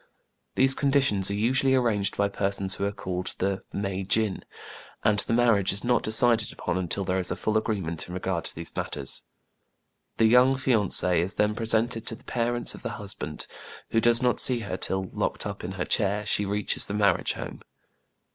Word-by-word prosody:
These 135 +1 +4
conditions 135 -9 +1
are 100 - -2
usually 130 +5 +2
arranged 110 -6 0
by 100 - +2
persons 100 -1 0
who 100 - -2
are 100 - -1
called 90 -2 -5
the 95 +1 -2
" - - -46
mei 95 -1 -3
jin, 105 +1 0 0.6
and 105 -1 +3
the - - -2
marriage 115 -5 +3
is 100 - -1
not 120 -1 +2
decided 115 0 +3
upon - - -3
until 95 +1 -2
there 90 +1 0
is 90 - +1
a - - -1
full 110 - -2
agreement 100 -7 -2
in 90 - -7
regard 90 -2 -3
to - - -1
these 85 0 -6
matters. 70 -2 -3 0.9
The 115 - +4
young 125 +4 +5
fiancée 105 -9 +2
is 90 +5 -1
then 105 0 +1
presented 115 +1 -1
to 115 - +1
the - - -19
parents 120 0 -1
of - - -11
the - - -4
husband, 95 -7 -3 0.5
who 115 - +2
does 120 +1 +5
not 125 -1 +2
see 125 -2 +3
her 100 -4 -4
till, 95 0 -2
locked - - -2
up - - -6
in 90 +2 -5
her 95 -2 -3
chair, 105 0 0
she 105 0 +1
reaches 105 +1 +2
the 100 - -4
marriage 100 -4 +2
home. - - -8
105 Hz, 195 wpm, -26 LUFS, 95-115 Hz, 0.9 s, young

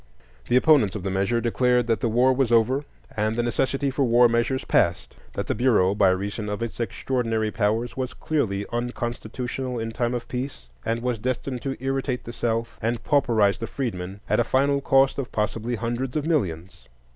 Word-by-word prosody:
The 120 - +2
opponents 130 - +4
of 100 - -4
the 95 - -2
measure 100 +5 +1
declared 125 +1 +2
that 115 -3 +1
the 115 - 0
war 125 +4 +4
was 130 -2 +1
over, 125 +5 +3 0.3
and 110 +1 0
the 120 - 0
necessity 135 +3 0
for 135 +1 0
war 120 0 +5
measures 120 +3 0
past; 85 0 +1 0.2
that - - -3
the - - -1
Bureau, 105 -7 +3
by 100 -2 +4
reason 100 +3 -2
of 105 +2 -3
its 115 - -6
extraordinary 115 -1 -1
powers, 110 +3 0
was 130 -1 -4
clearly 100 -10 -1
unconstitutional 120 +1 -3
in 115 0 -3
time 120 +2 -1
of 120 - -5
peace, 125 - -5
and 115 +1 -2
was 125 -3 -1
destined 130 +1 -3
to 135 -1 -3
irritate 135 -1 -2
the 120 - -8
South 115 0 -2
and 115 +1 -1
pauperize 115 -8 +2
the 115 - -4
freedmen, 100 -7 -4
at - - +2
a - - +4
final 140 +3 +2
cost 135 0 +3
of 135 - -4
possibly 110 +3 -1
hundreds 120 +4 -2
of 150 - -2
millions. 90 - -2
120 Hz, 190 wpm, -24 LUFS, 110-130 Hz, 0.3 s, war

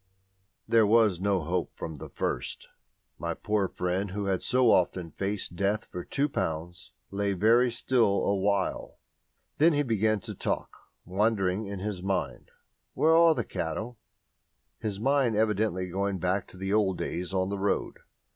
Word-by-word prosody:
There 115 -2 +4
was 105 -5 +4
no 100 -2 +1
hope 85 +3 -2
from 80 -2 -6
the - - -9
first. - - -3 0.5
My - - -2
poor 105 -2 0
friend, 90 +3 -2
who 100 +2 -3
had 95 -2 0
so 125 -2 +4
often 90 -2 +1
faced 100 -3 -3
Death 100 +3 0
for 90 - -5
two 140 +1 0
pounds, 85 - -4 0.2
lay 100 0 0
very 115 +6 +4
still 120 -4 +2
awhile. 100 0 0 0.6
Then 160 +2 +6
he 145 0 +2
began 110 -3 +1
to - - -6
talk, - - -3 0.3
wandering 100 +1 0
in 100 0 -5
his 100 -1 -4
mind, 85 -10 -2 0.5
"Where 160 +1 +4
are 165 -1 +6
the - - -1
cattle?" 105 +9 -4 0.8
his 105 -3 -3
mind 130 -1 +2
evidently 105 -4 +1
going 100 +2 -1
back 90 +2 -1
to - - -15
the 95 +1 -2
old 100 -4 +2
days 90 +2 -3
on 95 0 0
the 100 0 -3
road. 100 +1 -1
100 Hz, 155 wpm, -28 LUFS, 90-110 Hz, 0.8 s, Then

